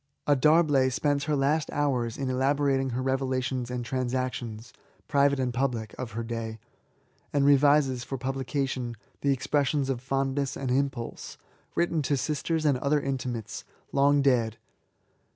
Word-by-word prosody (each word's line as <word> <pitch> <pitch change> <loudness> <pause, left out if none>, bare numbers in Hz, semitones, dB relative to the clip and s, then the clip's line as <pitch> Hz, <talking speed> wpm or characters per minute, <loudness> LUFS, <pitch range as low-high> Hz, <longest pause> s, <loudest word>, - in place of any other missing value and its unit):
A 145 - +4
D'Arblay 145 -2 +4
spends 145 +2 0
her 150 -1 +1
last 145 +2 +1
hours 125 -6 0
in 135 - -2
elabo 135 +3 +1
rating 135 -1 +2
her 125 +1 -2
revelations 130 -1 -1
of 125 - -3
the 120 - -3
transactions^ 125 -3 -3 0.4
private 140 -1 +3
and 125 -2 -1
public, 120 -4 -1
of 125 -4 -5
her 115 +1 -3
day; 115 -1 -4 0.7
and 140 -1 +2
revises, 140 -2 +4
for 135 - -5
publica 135 +2 -2
tion, 125 -3 -4 0.2
the 140 - +2
expressions 140 +1 +1
of 125 -2 -3
fondness 135 +1 -1
and 130 -2 -2
impulse^ 130 -3 -2 0.4
written 170 -2 +1
to 140 0 0
sisters 155 +3 -1
and 140 -4 +3
other 145 +3 +2
intimates, 125 -6 -4 0.3
long 140 +1 +4
dead. 115 -5 +2
135 Hz, 150 wpm, -27 LUFS, 125-140 Hz, 0.7 s, A